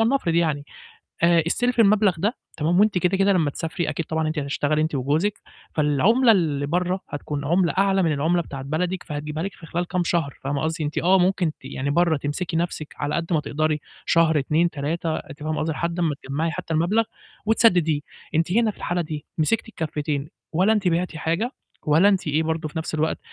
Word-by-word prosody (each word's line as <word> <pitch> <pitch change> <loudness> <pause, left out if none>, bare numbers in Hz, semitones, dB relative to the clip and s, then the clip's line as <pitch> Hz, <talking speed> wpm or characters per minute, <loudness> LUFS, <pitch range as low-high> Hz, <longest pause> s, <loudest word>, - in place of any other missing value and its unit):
ولنفرض 225 -7 +2
يعني، 155 -4 +1 0.6
آآ 170 -1 +5
استلفي 245 +6 +2
المبلغ 205 -3 +4
ده 210 +9 -1 0.2
تمام، 165 +4 +2
وأنتِ 210 -2 +4
كده، 180 +1 +2
كده 195 +1 +4
لمّا 165 -6 +2
تسافري 160 +2 -3
أكيد 155 +2 -3
طبعًا 160 0 -1
أنتِ 155 0 -1
هتشتغلي 145 +2 0
أنتِ 155 -1 -1
وجوزِك، 150 +10 0 0.3
فالعملة 190 - +4
اللي 155 -8 +1
برّه 180 +4 0
هتكون 145 -1 -4
عملة 170 +3 +2
أعلى 195 -1 +3
من 165 - +2
العملة 160 +5 +1
بتاعة 135 -4 -7
بلدِك 175 +6 -2
فهتجيبها 150 0 -4
لِك 195 0 -4
في 165 - -13
خلال 175 +2 -2
كام 180 -1 0
شهر 165 -6 0
فاهمة 140 +1 -1
قصدي، 160 +1 -1
إن - - 0
أنت 150 - -6
آه 185 +3 +4
ممكن 180 -2 +2
ت 140 - -21
يعني 135 +1 -3
برّه 165 +1 +3
تمسكي 165 +4 -3
نفْسِك 165 -3 -3
على 145 +1 -1
قد 170 +1 -2
ما 160 - +3
تقدري، 155 +1 -1 0.3
شهر 160 -2 +4
2 155 +5 +2
3 160 +2 -2
أنتِ 145 - -9
فاهمة 155 0 -1
قصدي، 160 +1 -1
لحد 170 +4 -2
أمّا 160 -4 +1
تجمَّعي 150 +5 -1
حتّى 165 - -4
المبلغ 175 +8 +2 0.4
وتسدديه، 180 -9 +3 0.3
أنتِ 165 +2 +1
هنا 225 +2 +3
في - - -21
الحالة 175 0 -1
دي 155 -2 -6
مسكتي 195 +9 +1
الكافتين، 150 -5 -3 0.2
ولا 190 +7 +4
أنتِ 205 -4 +1
بعتِ 175 0 0
حاجة 170 - -1 0.3
ولا 160 +7 +5
أنتِ 190 -4 0
إيه 150 +2 +1
برضه 160 0 -2
في 155 - -7
نفْس 160 - -4
الوقت 155 +1 0
165 Hz, 205 wpm, -23 LUFS, 150-180 Hz, 0.6 s, آآ